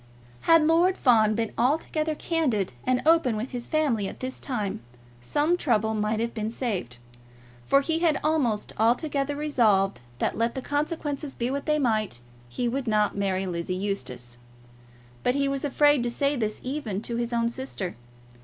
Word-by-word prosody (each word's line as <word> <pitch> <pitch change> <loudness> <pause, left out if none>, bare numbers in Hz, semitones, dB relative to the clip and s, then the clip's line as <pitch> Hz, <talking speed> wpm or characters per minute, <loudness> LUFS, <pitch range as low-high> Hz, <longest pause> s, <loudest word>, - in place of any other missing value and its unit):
Had 330 -2 +7
Lord 345 +4 +3
Fawn 220 -4 +4
been 225 -1 -1
altogether 305 +4 +1
candid 265 - 0
and 255 0 +2
open 320 -8 +4
with 230 +5 -4
his 245 -1 -4
family 270 -10 +1
at - - -8
this 260 0 -4
time, 210 -6 -3 0.4
some 295 - +1
trouble 220 -9 +1
might 215 0 0
have 230 +1 -2
been 220 -1 -2
saved; 205 - -3 0.7
for 275 - +5
he 320 +3 -1
had 325 -4 +2
almost 275 -9 0
altogether 275 +5 +1
resolved 220 - +2 0.2
that, - - -1
let 230 +1 0
the 265 - -3
consequences 290 -1 -2
be 240 +2 -2
what 280 +2 -3
they 300 0 +3
might, 215 - 0 0.3
he 240 - -2
would 255 +1 -2
not 210 -1 +2
marry 195 -1 0
Lizzie 175 0 -3
Eustace. 125 -12 -4 0.8
But 250 - +1
he 280 0 +1
was 275 -1 -2
afraid 290 -1 +4
to 240 - -1
say 280 +4 +1
this 215 -4 -2
even 250 -7 -3
to 235 0 -3
his 235 0 -1
own 235 -1 +1
sister. 235 -7 -4
245 Hz, 170 wpm, -26 LUFS, 215-290 Hz, 0.8 s, Had